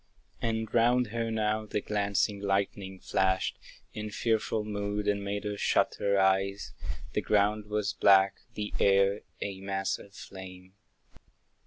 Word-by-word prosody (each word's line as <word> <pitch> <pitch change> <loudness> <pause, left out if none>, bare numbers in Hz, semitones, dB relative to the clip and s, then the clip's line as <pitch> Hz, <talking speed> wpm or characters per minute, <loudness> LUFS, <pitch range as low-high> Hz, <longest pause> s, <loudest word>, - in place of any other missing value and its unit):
And 110 -1 -2
round 120 0 +4
her 115 0 -1
now 110 -1 0
the 105 - -1
glancing 100 0 0
lightning 95 -1 -1
flashed 95 +1 0 0.3
In 105 0 -5
fearful 110 0 0
mood, 105 0 -3
and 100 -1 +1
made 100 +1 -3
her 105 -1 -3
shut - - +2
her 100 0 +2
eyes; 95 +1 +1 0.4
The - - +1
ground 105 0 +2
was 105 -1 -1
black, 95 0 +5 0.2
the 105 -1 -4
air 100 +1 +4 0.2
a 95 -1 -5
mass 95 0 -1
of 100 0 -14
flame. 95 -1 -10
100 Hz, 140 wpm, -29 LUFS, 95-105 Hz, 0.4 s, black